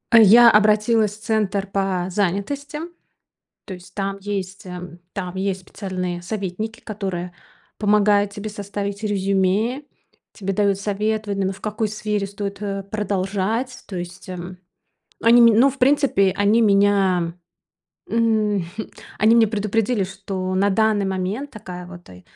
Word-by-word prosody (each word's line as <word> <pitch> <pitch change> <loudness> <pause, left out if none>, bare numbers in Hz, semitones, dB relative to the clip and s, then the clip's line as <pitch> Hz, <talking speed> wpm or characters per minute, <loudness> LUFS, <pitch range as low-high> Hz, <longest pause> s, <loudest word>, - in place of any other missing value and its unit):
Я 230 +2 +9
обратилась 215 0 +3
в - - -20
центр 205 -3 0
по 195 -2 -1
занятости. 205 - -2 0.9
То 195 - -7
есть 180 0 -13
там 195 -1 -3
есть, 195 -1 -5
а, 180 -1 -7 0.3
там 185 -2 -5
есть 190 0 -2
специальные 180 -2 -5
советники, 210 +3 -4
которые 190 -4 -5 0.4
помогают 205 -1 +3
тебе 205 +1 -6
составить 200 0 -5
резюме. 200 +5 +1 0.5
Тебе 195 -1 -4
дают 200 -1 +1
совет, 215 +1 -1
в - - -2
именно 195 -1 0
в 190 - -14
какой 215 +1 -2
сфере 210 -1 -2
стоит, 200 0 -6
э, 195 -1 -3
продолжать. 205 +4 -2
То 190 - -5
есть, 175 +2 -8
м, 180 0 -7 0.6
они, 235 +1 +6
м, 230 -2 +6
ну, 270 +3 +6
в 275 - -9
принципе, 255 -8 +3
они 205 +3 +3
меня, 200 -4 +3 0.8
м, 220 -2 +2 0.2
хм, 220 - -6 0.3
они 220 +2 +5
меня 230 -2 +5
предупредили, 215 +1 0
что 190 -1 -4
на 200 +2 +2
данный 215 0 +2
момент 190 +9 -3
такая 180 -5 -9
вот, 175 -1 -12
э, 90 0 -14
200 Hz, 140 wpm, -22 LUFS, 190-215 Hz, 0.9 s, Я